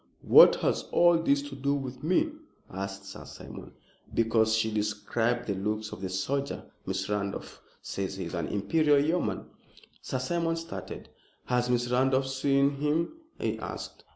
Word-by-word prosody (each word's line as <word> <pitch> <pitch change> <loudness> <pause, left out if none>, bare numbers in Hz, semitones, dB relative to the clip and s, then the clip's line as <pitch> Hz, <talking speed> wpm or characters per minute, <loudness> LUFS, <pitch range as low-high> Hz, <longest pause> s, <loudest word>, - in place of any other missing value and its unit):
"What - - +9
has - - 0
all 175 -1 +5
this 140 -3 +2
to 145 -1 -8
do 140 +1 0
with 130 -2 -5
me?" 185 - +2 0.4
asked 100 +1 -5
Sir - - -9
Simon. - - -10 0.4
"Because 110 -1 +3
she 110 0 +1
described 105 +3 -1
the 100 - -1
looks 105 +2 -2
of - - -8
the 95 - -3
soldier. 135 +10 -2 0.2
Miss 95 0 -2
Randolph 100 -1 -4 0.2
says 95 0 -3
he 95 - -4
is 85 - -7
an 85 -3 -2
Imperial 145 +8 +2
Yeoman." 145 - 0 0.6
Sir 130 - -3
Simon 165 +5 0
started. 165 0 -7 0.4
"Has 125 0 +1
Miss 120 0 +1
Randolph 135 +1 +2
seen 140 +1 +2
him?" 150 - 0 0.3
he - - -1
asked. - - -7
125 Hz, 155 wpm, -29 LUFS, 105-140 Hz, 0.6 s, What